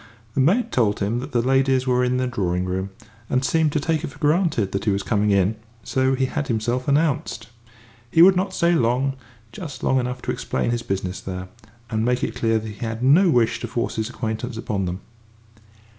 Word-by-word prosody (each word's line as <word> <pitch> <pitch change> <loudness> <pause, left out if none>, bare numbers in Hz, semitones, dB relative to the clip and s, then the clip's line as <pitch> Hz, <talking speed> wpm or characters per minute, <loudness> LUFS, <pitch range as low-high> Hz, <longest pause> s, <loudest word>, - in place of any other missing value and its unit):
The 135 - +1
maid 195 - +2
told 110 -4 +1
him 105 +4 0
that 135 +4 -7
the 120 -2 +1
ladies 135 0 +2
were 125 -1 +2
in 125 0 +1
the 130 - 0
drawing 90 -7 -1
room, 95 +1 -2 0.4
and 130 +1 +1
seemed 160 0 +2
to - - +1
take 155 +1 -1
it - - -2
for 140 - -12
granted 150 - +1
that 100 - -3
he - - +2
was 100 0 0
coming 105 0 +1
in, 100 +2 +2 0.3
so 130 +3 +1
he 130 0 +1
had 140 +2 -3
himself 120 +1 -1
announced. 140 -6 0 0.6
He 165 +7 +6
would 190 +1 +7
not 190 +2 0
stay 170 -2 +2
long 130 -1 +1 0.4
just 145 +2 -8
long 130 - +3
enough 125 0 -4
to - - -1
explain 65 - -2
his 120 -1 -1
business 95 -3 -3
there, 90 -1 -6 0.4
and 110 0 0
make 125 +1 +1
it - - -1
clear 115 -2 +1
that 110 0 -4
he 105 -1 -9
had 115 +1 -3
no 165 +8 +5
wish 120 -6 +2
to 120 - -4
force 120 0 -3
his 110 +1 -1
acquaintance 110 0 -4
upon 100 -4 -2
them. 90 +2 -4
125 Hz, 215 wpm, -22 LUFS, 110-135 Hz, 0.6 s, would